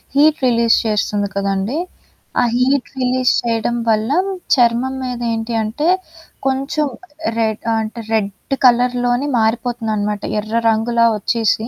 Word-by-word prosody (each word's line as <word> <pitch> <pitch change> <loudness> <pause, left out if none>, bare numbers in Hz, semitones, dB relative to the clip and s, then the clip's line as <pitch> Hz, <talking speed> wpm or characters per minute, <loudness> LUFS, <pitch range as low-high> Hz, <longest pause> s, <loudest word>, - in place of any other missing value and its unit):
Heat 305 +2 +4
release 235 -1 +3
చేస్తుంది 205 -1 0
కదండీ! 200 +6 -1 0.6
ఆ - - +3
హీట్ 260 +2 +1
రిలీజ్ 255 0 +2
చేయడం 230 0 -1
వల్ల 220 +3 +1 0.4
చర్మం 245 +1 +2
మీద 250 -1 -4
ఏంటి 225 +1 -3
అంటే 265 +10 -2 0.6
కొంచెం 275 +3 0 0.5
రెడ్ 220 -1 0 0.2
అంటే 220 +2 -5
రెడ్ 205 +5 -1
కలర్‌లోనే 245 +2 +2
మారిపోతుందనమాట. 220 -2 -1 0.2
ఎర్ర 215 +2 -5
రంగులా 230 +1 +2
వచ్చేసి, 220 +1 0
235 Hz, 115 wpm, -18 LUFS, 220-250 Hz, 0.6 s, హీట్